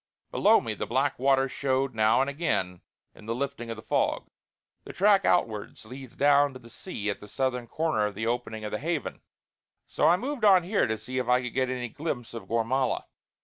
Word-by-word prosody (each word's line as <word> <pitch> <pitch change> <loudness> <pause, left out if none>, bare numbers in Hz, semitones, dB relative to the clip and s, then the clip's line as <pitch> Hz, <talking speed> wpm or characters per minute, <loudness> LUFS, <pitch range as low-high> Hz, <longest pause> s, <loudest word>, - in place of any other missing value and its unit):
Below - - +4
me - - -3
the - - -5
black - - 0
water 135 0 +3
showed 135 0 -1
now 110 +2 +3
and 135 - +1
again 140 - -2 0.3
in 105 - -15
the 115 - -1
lifting 135 -2 -4
of 115 - -3
the 110 - -11
fog. - - -1 0.5
The - - -9
track 200 0 +4
outwards 110 -10 0
leads 130 +2 -10
down 145 0 +4
to 130 - -10
the 115 -1 -16
sea 105 - -4
at - - -7
the 105 - -12
southern 125 0 -2
corner 115 -10 0
of 105 - -8
the 110 +2 -3
opening 115 -2 -3
of 105 - -5
the 105 - -2
Haven; 160 -1 -3 0.6
so - - +1
I 175 - +5
moved 265 +2 -4
on 190 -4 +6
here 195 +4 +1
to 110 0 -1
see 125 +4 -4
if 125 - -3
I 125 +1 +3
could 125 - -5
get 130 -1 0
any 125 -2 -3
glimpse 125 -5 -5
of 115 - -8
Gormala. 115 +3 0
130 Hz, 215 wpm, -27 LUFS, 115-145 Hz, 0.6 s, on